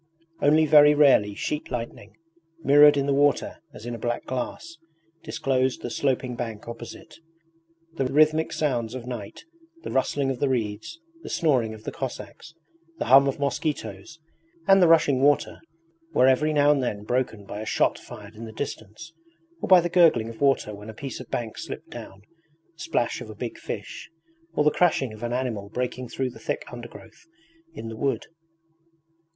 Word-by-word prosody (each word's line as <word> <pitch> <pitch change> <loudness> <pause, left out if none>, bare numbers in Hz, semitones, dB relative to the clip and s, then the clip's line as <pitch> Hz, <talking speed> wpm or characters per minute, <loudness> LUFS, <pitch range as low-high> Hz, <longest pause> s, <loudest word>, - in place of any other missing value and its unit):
Only 155 +2 +4
very 150 0 +7
rarely 130 -9 +4
sheet 150 +7 -3
lightning, 115 -4 -6 0.5
mirrored 145 +1 +7
in 140 - +1
the 140 - +1
water 145 0 +2
as 145 - -12
in 120 - -4
a 115 - -6
black 120 +2 -3
glass, 165 +6 -5 0.4
disclosed 130 -1 -1
the 120 - -4
sloping 130 -2 -1
bank 115 -3 -6
opposite. 120 +8 -10 0.8
The 135 - 0
rhythmic 155 +3 +3
sounds 125 -6 -1
of 125 -2 -7
night 120 -5 -7 0.4
the - - -5
rustling 135 +1 0
of 130 - -5
the 140 - +1
reeds, 110 - -3 0.2
the - - -9
snoring 125 -10 +1
of 110 - -14
the - - -5
Cossacks, 135 +4 -7 0.4
the - - -3
hum 140 +1 +8
of 135 - -1
mosquitoes, 140 -4 -3 0.5
and 195 0 +6
the 175 - +6
rushing 150 -5 +4
water, 145 +1 +2 0.6
were 130 - +5
every 145 +4 +3
now 145 -1 +4
and 145 -2 +2
then 105 -5 -3
broken 115 -3 -2
by 105 +1 -6
a - - -5
shot - - +1
fired 105 0 -11
in 115 +1 -9
the 110 - -8
distance, 120 +5 -7 0.5
or - - -2
by 185 -2 +8
the 175 - -1
gurgling 165 -10 +4
of 115 - -11
water 135 -6 +2
when 105 +2 -10
a 110 - -9
piece 135 +1 -6
of - - -10
bank 115 -2 -4
slipped - - -8
down, 95 +1 -10 0.5
the 165 - -30
splash 145 -8 -1
of - - -8
a 110 - -9
big 115 +2 -6
fish, - - -7 0.5
or - - +3
the 150 - +4
crashing 145 -10 +1
of 110 - -12
an 120 0 -3
animal 120 -5 -3
breaking 125 +1 -4
through 130 0 -2
the - - -14
thick - - -3
undergrowth 360 - -12 0.5
in 115 - -7
the 115 - -6
wood. 130 -1 -1
130 Hz, 180 wpm, -25 LUFS, 115-145 Hz, 0.8 s, hum